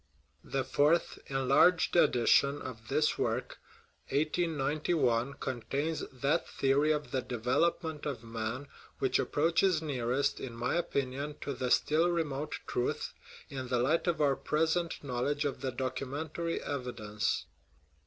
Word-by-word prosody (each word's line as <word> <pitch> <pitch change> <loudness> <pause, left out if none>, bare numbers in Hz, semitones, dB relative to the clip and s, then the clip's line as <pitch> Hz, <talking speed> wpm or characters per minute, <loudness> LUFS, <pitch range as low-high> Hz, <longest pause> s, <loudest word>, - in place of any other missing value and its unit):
The - - -1
fourth, 150 +4 +2
enlarged, 135 +8 +4
edition 140 -1 +4
of 115 -3 -8
this 150 +6 +1
work - - -1 0.5
(1891) 145 -4 +1
contains 140 +6 -2
that 140 +3 0
theory 140 +3 +2
of 150 -1 -1
the 130 - 0
development 150 +7 0
of 130 -6 -4
man 115 +4 -4 0.3
which 135 - +1
approaches 165 +3 +2
nearest, 140 -2 0
in 120 -3 -6
my 120 +3 -1
own 175 - +2
opinion, 140 -1 -2
to 140 - -3
the 125 0 -2
still 160 +6 +3
remote 155 -3 -2
truth, 125 - -2 0.3
in 130 -2 -5
the 125 - +1
light 145 +9 +2
of 175 - +1
our 140 -2 +4
present 160 +4 0
knowledge 140 +3 -1
of 140 - -2
the 135 -2 -1
documentary 140 +6 -3
evidence. 120 -6 -2
140 Hz, 130 wpm, -31 LUFS, 125-155 Hz, 0.5 s, enlarged